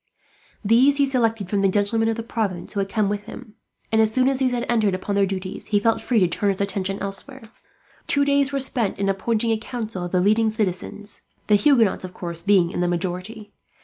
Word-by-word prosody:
These 255 +7 +4
he 280 - +4
selected 225 -6 0
from 200 +1 0
the 195 - +4
gentlemen 205 +3 +1
of 225 - 0
the 230 - -5
province 205 -7 -3
who 200 - -2
had 195 0 -1
come 215 -1 +1
with 205 0 -3
him 230 -4 -10 0.4
and, 220 0 +4
as 220 -1 +2
soon 255 +3 +2
as 270 -1 +1
these 260 -2 +2
had 245 0 -2
entered 215 -5 +2
upon 185 +2 -4
their 200 -1 +2
duties, 190 0 -5
he 205 - +2
felt 225 +2 +1
free 240 -3 +1
to 180 - +4
turn 200 +4 0
his 190 - -5
attention 195 -1 -2
elsewhere. 200 +7 -6 0.6
Two 285 -1 +2
days 280 -1 +2
were 275 - -1
spent 245 -6 -1
in 195 0 0
appointing 225 +4 0
a 220 - 0
council 220 -5 -5
of 175 - -5
the 185 - +2
leading 215 +4 +3
citizens, 205 -1 -3 0.2
the 210 - +1
Huguenots 225 -3 +3
of 185 -1 -8
course 170 -2 -4
being 185 -3 +3
in - - -4
the 175 - +1
majority. 185 +5 -4
210 Hz, 225 wpm, -23 LUFS, 195-230 Hz, 0.6 s, These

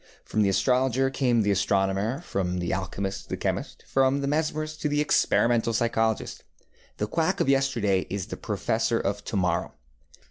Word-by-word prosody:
From 110 - 0
the 100 - +3
astrologer 130 +6 +2
came 125 -4 +2
the 100 - +2
astronomer, 100 - +1
from 90 - -2
the 90 -1 -2
alchemist 95 +1 -4
the - - -3
chemist, - - -3
from 135 +1 +2
the 140 - -1
mesmerist 155 +1 -2
the 145 -1 0
experimental 120 -5 +2
psychologist. 115 -1 0 0.5
The 105 - -1
quack 165 - 0
of - - +1
yesterday 125 -9 +1
is 100 -1 -3
the 110 - -6
professor 110 +3 -1
of 100 +1 -2
to - - -4
morrow. 90 -2 0
115 Hz, 155 wpm, -26 LUFS, 100-135 Hz, 0.5 s, the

